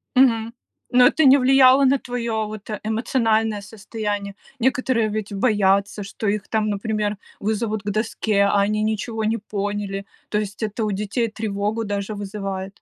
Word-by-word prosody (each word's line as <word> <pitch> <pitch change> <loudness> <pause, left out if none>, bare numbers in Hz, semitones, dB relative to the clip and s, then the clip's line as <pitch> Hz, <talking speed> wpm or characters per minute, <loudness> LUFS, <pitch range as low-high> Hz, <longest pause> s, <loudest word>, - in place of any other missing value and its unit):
Мгм. 230 -3 +3 0.4
Но 250 0 +7
это 315 - +2
не 270 0 +8
влияло 265 0 +6
на 270 +1 +4
твоё, 235 -4 -3
вот, 215 0 -9
э, 210 -2 -3
эмоциональное 220 -1 +1
состояние. 205 -1 -5 0.2
Некоторые 255 -2 +1
ведь 210 -1 -4
боятся, 200 -1 +2
что 205 +2 -5
их 205 0 -1
там, 215 -1 0
например, 210 0 -1 0.2
вызовут 215 0 -1
к 205 - -3
доске, 215 -1 0
а 200 0 +3
они 210 +2 +1
ничего 220 +1 -2
не 220 +1 +1
поняли. 205 -1 -4 0.2
То 210 - 0
есть 210 0 -5
это 215 +1 -2
у 210 - 0
детей 210 +4 -1
тревогу 215 0 -2
даже 205 +1 -3
вызывает. 195 -1 -5
215 Hz, 160 wpm, -22 LUFS, 205-230 Hz, 0.4 s, не